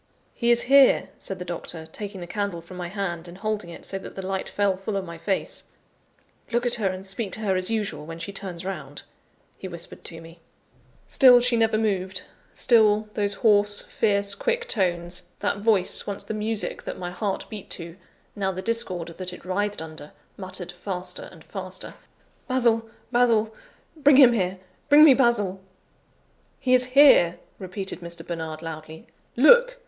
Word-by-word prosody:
"He 235 - -1
is 240 0 +4
here," 275 +1 +5
said 195 - -5
the 180 - -7
doctor, 170 -1 -6
taking 195 +3 -8
the - - -5
candle 200 -1 -3
from 170 +2 -12
my 175 -1 -4
hand, 175 -3 -4
and 175 +1 -11
holding 210 -2 -3
it, 170 - -10
so 195 - -3
that - - -10
the 190 - -6
light 190 0 -3
fell 200 -2 +1
full 195 +2 -4
on 195 - -3
my 170 -1 -9
face. 195 +2 -3 0.9
"Look 240 +1 0
at 240 - +1
her 200 - +2
and 185 +1 -6
speak 195 +1 -3
to 220 - -3
her 195 -3 0
as 185 +1 -1
usual, 205 -9 -2
when 165 0 -7
she 165 +4 -7
turns 185 -3 -6
round," 150 -7 -6 0.6
he 190 - -6
whispered 170 -1 -8
to 165 - -7
me. 165 +1 -14 0.7
Still 250 -3 +7
she 245 0 +2
never 225 -1 +2
moved; 190 -4 0 0.3
still 215 -3 +3
those 205 -1 +2
hoarse, 205 -1 +4
fierce, 200 -2 +2
quick 475 - -1
tones 175 -3 0 0.2
that 205 0 -1
voice, 205 -4 +2
once 200 -1 -4
the - - -5
music 215 0 -2
that - - -6
my 175 -1 -5
heart 195 +2 -3
beat 210 -3 -9
to; 170 -1 -5 0.4
now 195 -2 -1
the 185 0 -6
discord 185 -7 -1
that 180 +2 -6
it 180 - -12
writhed 205 0 -2
under 155 -2 -10 0.2
muttered 185 -2 -5
faster 185 - -5
and - - -15
faster: - - -6 0.5
"Basil! 235 -4 +1 0.2
Basil! 230 -3 +2 0.4
Bring 290 -2 +5
him 255 -4 +8
here! 190 -4 -1 0.3
bring 295 +1 +8
me 300 -3 +9
Basil!" 220 -7 +1 1.0
"He 255 -2 +1
is 255 0 +5
here," 225 -12 +7 0.2
repeated 190 0 -4
Mr. 170 -1 -8
Bernard 160 -2 -5
loudly. 160 +3 -8 0.3
"Look! 485 - +6
195 Hz, 175 wpm, -24 LUFS, 175-225 Hz, 1.0 s, me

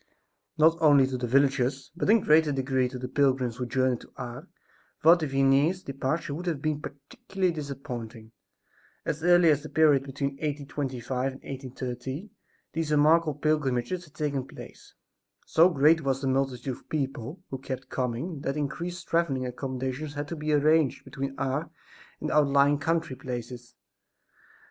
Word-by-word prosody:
NOT 160 +2 +4
only 145 -4 +6
to 130 0 -3
the 125 -1 -2
villagers, 135 0 +1
but 185 - -1
in 225 - +7
a - - -3
greater 155 -2 +4
degree 130 -2 0
to 130 - -7
the 125 0 -5
pilgrims 130 -3 +1
who 125 -1 -3
journeyed 130 0 +1
to - - -16
Ars, 125 +7 -7 0.5
Father 165 0 +5
Vianney's 135 +6 +2
departure 140 +3 -2
would 175 +5 -6
have 160 -5 -1
been 150 0 -2
particularly 170 +7 -3
disappointing. 125 -7 -7 0.7
As 150 +2 -3
early 175 -2 +6
as 145 -1 +1
the 155 - -9
period 150 -4 +4
between 140 0 -3
1825 135 -3 -3
and 135 - -14
1830, 130 - -6 0.4
these 160 -2 -2
remarkable 155 +1 +4
pilgrimages 150 +2 0
had 150 -1 -21
taken 140 -4 -2
place. - - -13 0.5
So 165 +3 +5
great 160 0 +4
was 135 -2 0
the 135 - -3
multitude 130 -1 -1
of - - -24
people 140 +2 -3
who 135 - -4
kept 130 -1 -6
coming 130 +6 -3
that 140 +1 -2
increased 170 +5 -4
traveling 150 -7 +1
accomodations 130 +3 -4
had 145 0 -3
to - - -4
be 150 0 -2
arranged 150 -1 +3
between 135 0 -5
Ars 135 +4 -1 0.5
and - - -3
the - - -1
outlying 140 -1 +4
country 160 -2 -1
places. 120 -1 -7
140 Hz, 160 wpm, -27 LUFS, 130-155 Hz, 0.7 s, in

